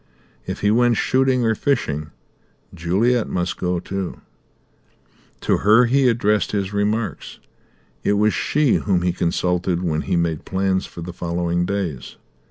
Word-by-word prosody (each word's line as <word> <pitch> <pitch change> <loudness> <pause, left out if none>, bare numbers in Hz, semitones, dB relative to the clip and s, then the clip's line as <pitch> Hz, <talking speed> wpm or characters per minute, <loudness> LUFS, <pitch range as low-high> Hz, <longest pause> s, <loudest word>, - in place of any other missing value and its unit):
If - - -4
he 105 - +3
went 120 0 +3
shooting 130 -2 +2
or 110 - +3
fishing 80 - -1 0.6
Juliet 100 +8 +1
must 90 0 -2
go 90 -1 -1
too; 95 +1 -5 1.2
to - - +2
her 110 +4 +5
he 130 +1 +3
addressed 105 -3 +1
his 100 -1 -2
remarks; 105 0 -2 0.7
it 100 - +2
was 105 +1 +2
she 150 -4 +2
whom 90 -4 0
he 90 -1 +1
consulted 90 +1 0
when 80 -3 0
he - - -1
made 85 -3 -1
plans 95 0 -1
for 85 - -10
the 85 +1 -6
following 85 0 -1
days. 90 -10 -4
95 Hz, 145 wpm, -21 LUFS, 85-110 Hz, 1.2 s, her